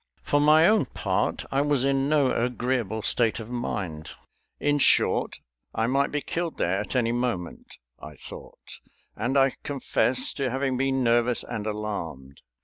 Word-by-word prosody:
For 145 Hz, -, +2 dB
my 155 Hz, +2 st, +6 dB
own 215 Hz, -8 st, +3 dB
part, 105 Hz, -3 st, -2 dB
I 135 Hz, -, +2 dB
was 145 Hz, -3 st, +1 dB
in 135 Hz, 0 st, +1 dB
no 145 Hz, -4 st, +3 dB
agreeable 120 Hz, -3 st, -1 dB
state 115 Hz, -2 st, +1 dB
of 115 Hz, +1 st, -8 dB
mind. 95 Hz, -10 st, -4 dB, 0.5 s
In 145 Hz, 0 st, +1 dB
short, -, -, +3 dB, 0.4 s
I 110 Hz, -, +1 dB
might 135 Hz, +4 st, +1 dB
be 150 Hz, -, -1 dB
killed 170 Hz, +2 st, -3 dB
there 90 Hz, +3 st, 0 dB
at 105 Hz, -, -5 dB
any 120 Hz, -2 st, +2 dB
moment, 120 Hz, -8 st, -3 dB, 0.2 s
I 75 Hz, -1 st, -10 dB
thought, -, -, -11 dB, 0.4 s
and 135 Hz, +3 st, -1 dB
I 135 Hz, -1 st, +4 dB
confess 150 Hz, -, 0 dB
to 135 Hz, -2 st, -2 dB
having 135 Hz, +1 st, -1 dB
been 135 Hz, 0 st, 0 dB
nervous 120 Hz, 0 st, +2 dB
and 105 Hz, 0 st, -5 dB
alarmed. 85 Hz, -11 st, -5 dB
125 Hz, 155 wpm, -26 LUFS, 105-140 Hz, 0.5 s, my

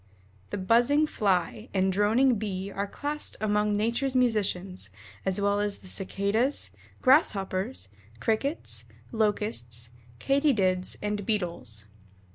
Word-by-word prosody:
The -, -, -3 dB
"buzzing 240 Hz, +10 st, +4 dB
Fly" 200 Hz, -, 0 dB
and 190 Hz, 0 st, +2 dB
"droning 225 Hz, +4 st, +3 dB
Bee" 195 Hz, -2 st, -3 dB
are 200 Hz, +1 st, -2 dB
classed 295 Hz, +7 st, -4 dB
among 210 Hz, 0 st, +1 dB
nature's 235 Hz, +5 st, 0 dB
musicians, 195 Hz, -6 st, +1 dB, 0.4 s
as 190 Hz, +1 st, +1 dB
well 200 Hz, 0 st, +2 dB
as 205 Hz, -1 st, -1 dB
the 190 Hz, -, -13 dB
Cicadas, 200 Hz, +8 st, 0 dB, 0.3 s
Grasshoppers, 195 Hz, -, +2 dB, 0.3 s
Crickets, 275 Hz, -, -1 dB, 0.3 s
Locusts, 205 Hz, -, -1 dB, 0.3 s
Katydids, 205 Hz, -, +2 dB
and 210 Hz, 0 st, -1 dB
Beetles. 170 Hz, -, -3 dB
205 Hz, 105 wpm, -28 LUFS, 190-235 Hz, 0.4 s, buzzing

